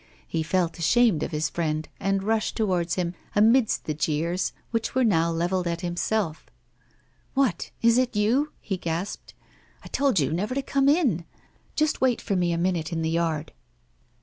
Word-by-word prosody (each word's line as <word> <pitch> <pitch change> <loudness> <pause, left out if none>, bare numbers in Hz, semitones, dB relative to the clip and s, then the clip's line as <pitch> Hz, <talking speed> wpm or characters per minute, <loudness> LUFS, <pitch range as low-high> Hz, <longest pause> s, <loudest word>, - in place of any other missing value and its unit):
He 165 - -1
felt 170 +1 0
ashamed 210 0 +3
of - - -1
his 155 +1 -1
friend, 155 0 -2
and 195 0 0
rushed 220 +1 0
towards 180 -6 0
him, 175 -2 -1 0.2
amidst 225 +3 +4
the 155 - -1
jeers, 160 +4 -1 0.2
which 230 +1 -2
were 260 - +3
now 170 -7 +3
levelled 175 +2 0
at 170 0 -2
himself: 175 -1 -2 0.9
'What, 270 -4 +1
is 230 +1 +5
it 250 -3 0
you?' 240 +9 +2
he 195 -3 -3
gasped. 175 +3 -4 0.5
'I - - -10
told 275 -9 +2
you 145 +1 +1
never 205 +9 -2
to 275 - -1
come 275 0 +2
in. 270 - +2 0.5
Just 305 -1 +1
wait 255 -2 +3
for 200 - -2
me 175 -1 +1
a 170 - 0
minute 170 -2 0
in 165 -1 -2
the 160 - 0
yard. 165 -2 -1
180 Hz, 175 wpm, -25 LUFS, 165-230 Hz, 0.9 s, is